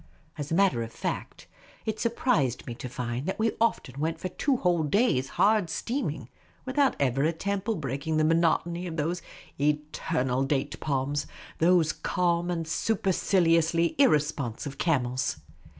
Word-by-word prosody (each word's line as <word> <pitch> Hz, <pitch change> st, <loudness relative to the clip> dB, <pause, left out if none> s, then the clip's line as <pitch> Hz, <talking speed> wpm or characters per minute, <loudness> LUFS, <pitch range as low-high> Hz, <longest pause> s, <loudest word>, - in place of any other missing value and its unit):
As 145 Hz, -1 st, -5 dB
a -, -, +2 dB
matter 190 Hz, -10 st, +3 dB
of 115 Hz, 0 st, -5 dB
fact, -, -, -5 dB, 0.4 s
it 220 Hz, 0 st, -2 dB
surprised 230 Hz, -, +1 dB
me 120 Hz, -, -5 dB
to 125 Hz, +2 st, -7 dB
find 125 Hz, +3 st, -4 dB
that 190 Hz, -, -2 dB
we 225 Hz, 0 st, +2 dB
often 140 Hz, -, 0 dB
went 160 Hz, +2 st, -1 dB
for 185 Hz, -, -3 dB
two 265 Hz, +8 st, 0 dB
whole 175 Hz, -6 st, +2 dB
days' 150 Hz, -, +2 dB
hard 205 Hz, -4 st, +4 dB
steaming 160 Hz, -, -3 dB, 0.4 s
without 270 Hz, +1 st, +2 dB
ever 135 Hz, 0 st, +1 dB
a 160 Hz, -, +3 dB
temple 200 Hz, +5 st, -2 dB
breaking 145 Hz, +1 st, -2 dB
the 155 Hz, -, +3 dB
monotony 170 Hz, +2 st, +2 dB
of 165 Hz, -1 st, -5 dB
those 165 Hz, +4 st, -1 dB, 0.4 s
eternal 145 Hz, -3 st, 0 dB
date 140 Hz, +1 st, -1 dB
palms, 140 Hz, 0 st, -1 dB, 0.3 s
those 170 Hz, -1 st, +4 dB
calm 175 Hz, -1 st, 0 dB
and 165 Hz, -2 st, -2 dB
superciliously 170 Hz, -4 st, +2 dB
irresponsive 145 Hz, -, +1 dB
camels. 130 Hz, -6 st, 0 dB
160 Hz, 145 wpm, -27 LUFS, 140-185 Hz, 0.4 s, hard